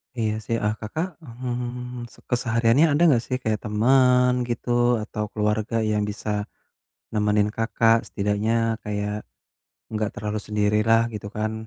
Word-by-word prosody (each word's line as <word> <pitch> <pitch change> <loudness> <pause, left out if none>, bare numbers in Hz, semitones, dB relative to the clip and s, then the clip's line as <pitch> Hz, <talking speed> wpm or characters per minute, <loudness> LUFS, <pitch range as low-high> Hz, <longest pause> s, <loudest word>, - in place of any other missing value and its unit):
Iya 110 -3 0
sih, 115 - 0
eee, 105 0 +2
Kakak, 160 - -4
mmm, 125 -2 -5
se - - -18
kesehariannya 120 +3 +3
ada 145 - +1
gak 120 -3 +2
sih 130 - -1
kayak 110 -1 0
temen 125 +3 +4 0.2
gitu 120 0 -4 0.3
atau 105 0 -4
keluarga 105 +1 -1
yang 105 -1 +1
bisa 105 +1 -5 0.8
nemenin 105 -1 +2
Kakak 115 0 +3
setidaknya, 105 +2 0 0.3
kayak 105 0 -3 0.8
gak 110 -1 -1
terlalu 105 +1 -3
sendirilah 105 +2 +3
gitu 105 -1 -6
kan. 110 0 -1
110 Hz, 135 wpm, -24 LUFS, 105-125 Hz, 0.8 s, temen